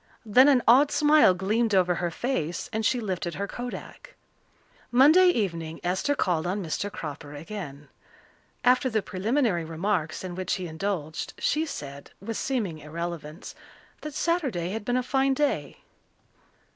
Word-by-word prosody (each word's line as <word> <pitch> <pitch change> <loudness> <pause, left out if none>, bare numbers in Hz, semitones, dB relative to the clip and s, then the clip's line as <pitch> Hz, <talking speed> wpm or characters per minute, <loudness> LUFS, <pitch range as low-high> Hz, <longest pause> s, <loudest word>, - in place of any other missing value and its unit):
Then 250 +6 +6
an 265 -4 +4
odd 270 +5 +6
smile 300 -10 +5
gleamed 210 +4 +1
over 180 -1 +3
her 175 0 -2
face 175 - -3
and 220 +1 -1
she 245 +3 +2
lifted 185 -5 -3
her 200 +1 -3
kodak. 245 +4 -8 0.7
Monday 300 +9 +6
evening 170 - -1
Esther 185 +11 0
called 175 - 0
on 195 +2 -2
Mr. 200 +5 -3
Cropper 150 -3 -7
again. 145 -4 -8 0.8
After 255 +1 +4
the 220 -3 0
preliminary 210 - 0
remarks 165 0 -2
in 185 -1 -5
which 185 0 -2
he 185 - -5
indulged, 160 -2 -4
she 315 +2 0
said, 140 - -8
with 225 +3 -5
seeming 210 -12 -2
irrelevance, 160 +1 -6 0.5
that 305 -2 -7
Saturday 270 - 0
had 220 +1 -4
been 245 +2 +1
a 255 - 0
fine 270 +1 +1
day. 290 0 -1
200 Hz, 145 wpm, -26 LUFS, 170-250 Hz, 0.8 s, Then